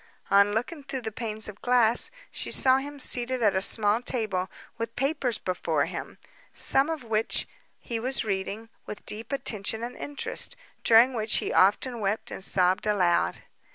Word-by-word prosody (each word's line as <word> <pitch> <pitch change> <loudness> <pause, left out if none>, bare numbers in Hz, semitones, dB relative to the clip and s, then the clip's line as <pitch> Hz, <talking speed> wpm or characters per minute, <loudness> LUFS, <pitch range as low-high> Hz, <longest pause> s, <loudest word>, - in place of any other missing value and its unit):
On 200 +1 +4
looking 280 +7 -3
through 270 -1 -5
the 220 - -5
panes 220 -1 -2
of 210 -1 -10
glass, 245 -2 +3 0.2
she - - -4
saw 260 0 +3
him 285 +1 -6
seated 250 -1 +1
at 205 -3 +3
a 190 - +1
small 210 +2 +6
table, 215 -7 -1 0.3
with 230 0 -4
papers 270 -3 -1
before 185 -1 -1
him, - - -7 0.3
some 275 +3 +2
of 320 -5 -4
which 225 -1 0 0.3
he 230 -1 -5
was 255 +1 +1
reading 205 +2 -4 0.2
with 210 - -8
deep 225 +4 -6
attention 220 -4 -2
and 245 +1 -6
interest, 290 -1 -2 0.3
during 235 +3 +6
which 220 -2 0
he - - -1
often 230 +6 +2
wept 215 +3 -2
and - - -6
sobbed 185 +1 +2
aloud. 185 -5 +1
225 Hz, 165 wpm, -26 LUFS, 205-250 Hz, 0.3 s, small